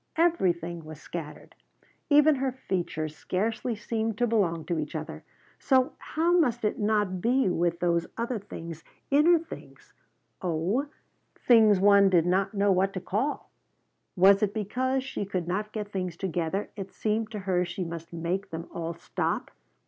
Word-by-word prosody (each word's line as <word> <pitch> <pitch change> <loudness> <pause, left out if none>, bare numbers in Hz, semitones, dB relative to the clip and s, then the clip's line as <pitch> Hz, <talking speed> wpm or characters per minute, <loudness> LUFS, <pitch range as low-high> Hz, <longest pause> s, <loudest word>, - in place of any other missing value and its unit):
Everything 175 - +1
was 155 -1 -10
scattered. 165 -3 -8 0.6
Even 295 +1 +6
her 265 0 0
features 170 - -3
scarcely 225 +8 -2
seemed 220 0 -2
to 245 - +2
belong 185 -8 0
to 170 -3 -1
each 150 +1 -5
other, 155 +1 -6 0.4
so 260 -2 +2
how 340 +3 +1
must 240 -8 +1
it 210 - -1
not 205 -4 +1
be 255 +3 +2
with 170 -1 0
those 170 -1 +1
other 235 0 -2
things, 165 -5 -8 0.3
inner 310 +5 +6
things, 330 0 -11 0.5
oh, 185 - 0 0.6
things 220 -5 +6
one 200 0 +6
did 175 -3 +3
not 195 +3 +1
know 200 0 +3
what 190 +1 +2
to 185 - -3
call? 225 +11 -2 0.6
Was 195 +1 +6
it 205 0 0
because 255 +5 -1
she 265 - -4
could 185 -3 -3
not 210 +4 -2
get 210 -2 -5
things 185 -4 -3
together 180 +1 -2
it 195 -2 -7
seemed 215 0 -1
to 220 - -6
her 185 -2 +1
she 180 +1 -4
must 165 -1 -7
make 175 +4 -3
them 165 0 -6
all 165 0 -4
stop? 170 - -3
195 Hz, 160 wpm, -27 LUFS, 170-225 Hz, 0.6 s, Even